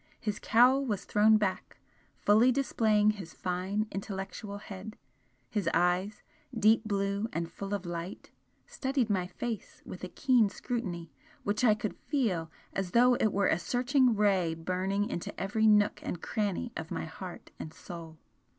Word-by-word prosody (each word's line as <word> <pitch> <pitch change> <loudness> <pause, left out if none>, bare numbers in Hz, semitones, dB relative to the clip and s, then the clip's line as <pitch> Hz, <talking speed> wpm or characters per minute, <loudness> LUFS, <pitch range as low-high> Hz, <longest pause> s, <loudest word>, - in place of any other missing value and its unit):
His 210 -2 -3
cowl 250 +5 +5
was 210 -7 -2
thrown 215 +1 +5
back, 200 -3 -2 0.4
fully 220 +5 +4
displaying 215 -5 +3
his 190 -6 -9
fine 185 +4 -1
intellectual 200 +1 -5
head 205 +1 -9 0.5
his 190 - -1
eyes, 180 +4 +1 0.3
deep 220 +1 +4
blue 200 +1 -1
and 170 0 -3
full 195 +3 -6
of 200 -2 -2
light, 175 +2 -6 0.3
studied 265 -4 -1
my 185 -3 0
face 220 +4 -6
with 185 - -9
a 185 - -4
keen 245 -4 +3
scrutiny 185 -8 -4 0.3
which 210 +3 -1
I 215 -4 +6
could 215 -1 -4
FEEL 200 - -1 0.2
as 195 -2 -2
though 245 +1 +6
it 220 -3 +2
were 200 +1 +1
a 165 - +2
searching 250 +3 +2
ray 190 -6 +2
burning 185 +5 -1
into 170 - -5
every 220 +3 +1
nook 210 -1 +4
and 175 - -4
cranny 210 +5 -2
of 160 -1 -5
my - - -3
heart 175 +3 -9
and 155 - -6
soul. 165 -1 -10
205 Hz, 155 wpm, -30 LUFS, 180-220 Hz, 0.5 s, I